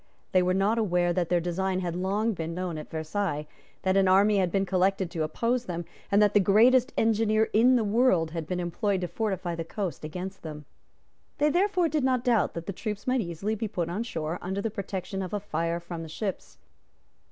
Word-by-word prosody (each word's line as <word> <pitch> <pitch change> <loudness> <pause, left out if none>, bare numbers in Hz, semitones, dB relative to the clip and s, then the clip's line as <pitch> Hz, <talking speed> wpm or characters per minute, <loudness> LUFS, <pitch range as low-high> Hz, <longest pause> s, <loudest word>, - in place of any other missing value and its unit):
They 185 - +4
were 180 +1 +1
not 205 +4 +2
aware 175 -4 +2
that 175 -1 -1
their 175 - +3
design 185 +2 -1
had 175 -2 -3
long 200 +5 0
been 165 -2 -4
known 180 -3 -3
at 150 - -9
Versailles, 160 -1 -2 0.4
that 190 0 +2
an 195 -1 +4
army 200 +3 +5
had 185 -3 +1
been 195 +1 +1
collected 190 -1 +1
to 165 - -3
oppose 235 +10 0
them, 170 -3 -4 0.3
and 200 - +5
that 205 - +3
the 205 - +6
greatest 240 +7 +5
engineer 220 0 +2
in 245 +4 +5
the 235 - +2
world 205 -7 +2
had 165 -2 -4
been 180 +1 -2
employed 185 +3 -1
to 180 - -1
fortify 190 -2 -2
the 165 0 -3
coast 185 0 -4
against 180 +5 -6
them. 150 -2 -8 0.7
They 295 +1 +3
therefore 365 0 +2
did 305 -3 0
not 255 -2 +2
doubt 235 -6 +2
that 170 0 -5
their 200 - -4
troops 210 +1 -5
might 255 -1 +2
easily 180 +3 -3
be 220 +1 -2
put 175 -5 -3
on 185 +6 -2
shore 165 -7 -3
under 190 +2 -3
the 215 +2 -2
protection 195 -1 -4
of 185 0 -5
a - - -1
fire 170 -3 -2
from 170 -1 -7
the 165 - -7
ships. 195 +4 -5
190 Hz, 215 wpm, -27 LUFS, 175-215 Hz, 0.7 s, the